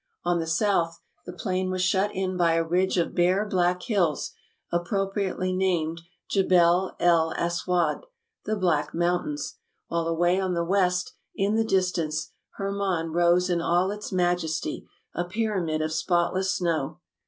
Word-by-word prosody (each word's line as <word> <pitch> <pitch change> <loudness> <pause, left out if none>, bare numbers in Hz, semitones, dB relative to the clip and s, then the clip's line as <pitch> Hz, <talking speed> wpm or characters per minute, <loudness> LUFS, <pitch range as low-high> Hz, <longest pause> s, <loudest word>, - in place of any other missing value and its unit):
On 175 0 +1
the 165 - -3
south 170 -1 +1 0.3
the - - -4
plain 185 0 -2
was 185 0 -1
shut 190 +2 +2
in 185 0 -1
by 170 -2 +3
a 165 0 +2
ridge 180 +3 +1
of 170 - 0
bare, 185 +4 +2
black 180 -2 +1
hills, 180 - 0 0.4
appropriately 190 +1 -1
named 170 -3 0 0.3
Jebel 180 -1 +3
el 165 -2 +3
Aswad, 175 - 0 0.4
"The 215 - 0
Black 175 -7 0
Mountains"; 175 -3 -1 0.3
while 170 -1 -1
away 175 +3 +2
on 185 -2 -1
the 170 0 0
west, 180 -1 +1 0.2
in 200 +2 +1
the 225 +1 +2
distance, 175 -6 0 0.2
Hermon 195 -4 -2
rose 175 +1 +3
in 175 -2 0
all 175 +3 +2
its 210 0 -6
majesty, 175 -3 -1 0.3
a 175 - -1
pyramid 180 -5 -1
of 155 - -2
spot 175 +2 +1
less 190 +1 0
snow. 165 -7 -1
180 Hz, 150 wpm, -26 LUFS, 170-190 Hz, 0.4 s, by